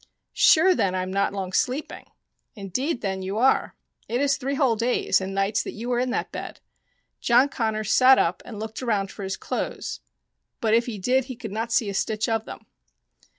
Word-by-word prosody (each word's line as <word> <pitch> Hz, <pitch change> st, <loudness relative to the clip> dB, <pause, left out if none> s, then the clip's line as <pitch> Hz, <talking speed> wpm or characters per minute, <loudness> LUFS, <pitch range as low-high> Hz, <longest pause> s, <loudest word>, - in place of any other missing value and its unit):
" -, -, -57 dB, 0.2 s
Sure 355 Hz, +4 st, +5 dB
then 190 Hz, -, 0 dB
I 185 Hz, -, -1 dB
am 185 Hz, +1 st, -5 dB
not 200 Hz, 0 st, +1 dB
long 190 Hz, -2 st, -5 dB
sleeping? 260 Hz, +8 st, -2 dB, 0.2 s
" -, -, -55 dB
" -, -, -54 dB
Indeed, 240 Hz, -, -3 dB
then, 190 Hz, -2 st, -2 dB
you 190 Hz, +2 st, -4 dB
are: 260 Hz, +4 st, +2 dB, 0.3 s
it 240 Hz, -, 0 dB
is 280 Hz, 0 st, +2 dB
three 275 Hz, +1 st, -3 dB
whole 265 Hz, -5 st, +2 dB
days 235 Hz, -2 st, +1 dB
and 190 Hz, +1 st, -4 dB
nights 195 Hz, +2 st, +1 dB
that -, -, -6 dB
you 235 Hz, +4 st, -5 dB
are 240 Hz, -, +1 dB
in 255 Hz, +1 st, 0 dB
that 250 Hz, -, -2 dB
bed." -, -, -7 dB, 0.6 s
John 245 Hz, +4 st, +4 dB
Connors 220 Hz, -4 st, -2 dB
sat 260 Hz, +1 st, +7 dB
up 170 Hz, +2 st, +1 dB
and 215 Hz, -3 st, -9 dB
looked 220 Hz, +2 st, -6 dB
around 205 Hz, -6 st, -1 dB
for -, -, -10 dB
his 190 Hz, 0 st, -3 dB
clothes, -, -, -4 dB, 0.6 s
but 220 Hz, -1 st, +1 dB
if 235 Hz, +2 st, +3 dB
he 225 Hz, -3 st, -4 dB
did 250 Hz, +6 st, +1 dB
he 255 Hz, -, -7 dB
could 225 Hz, -3 st, -8 dB
not 225 Hz, +3 st, -3 dB
see 230 Hz, -2 st, +2 dB
a 200 Hz, -, -3 dB
stitch 215 Hz, +3 st, -1 dB
of 225 Hz, -1 st, -1 dB
them. -, -, -10 dB
225 Hz, 220 wpm, -24 LUFS, 200-255 Hz, 0.6 s, sat